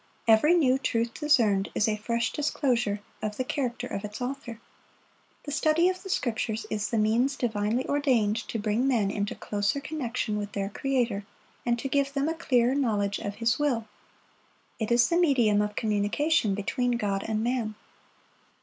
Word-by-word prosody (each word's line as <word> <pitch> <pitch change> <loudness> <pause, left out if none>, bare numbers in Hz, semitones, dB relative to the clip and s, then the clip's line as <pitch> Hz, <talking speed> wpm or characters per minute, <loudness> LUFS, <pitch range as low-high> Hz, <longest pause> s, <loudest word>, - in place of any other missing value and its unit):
Every 230 +10 +6
new 265 -6 +3
truth 230 -3 -1
discerned 225 -11 +2
is 210 - +2
a 215 - +1
fresh 235 +2 -1
disclosure 245 -8 0 0.2
of 210 -1 -3
the 255 - 0
character 250 -2 -2
of 200 -5 -5
its 210 0 -6
Author. 250 -3 -5 0.8
The 290 - -6
study 310 +4 +3
of 370 0 -4
the 385 - -9
Scriptures 225 - -1
is 210 -1 -1
the 230 - -1
means 230 +6 +2
divinely 225 0 -1
ordained 250 -7 +2
to - - -3
bring 215 +4 0
men 220 -7 +2
into 205 0 -2
closer 205 +6 -1
connection 255 -7 -3
with 205 0 -5
their 195 -1 -2
Creator, 240 -4 -1 0.4
and 240 0 +2
to 255 - -3
give 275 0 0
them 280 +1 0
a 325 - 0
clearer 255 -6 +2
knowledge 210 -7 0
of 205 0 -5
His 235 +4 +1
will. 255 -7 0 0.9
It 220 0 -2
is 235 0 +5
the 340 - +1
medium 245 -12 +3
of 210 0 -2
communication 215 +3 +1
between 245 +5 -1
God 200 -4 -1
and 220 0 -1
man. 235 -3 -1
235 Hz, 170 wpm, -27 LUFS, 210-275 Hz, 0.9 s, Every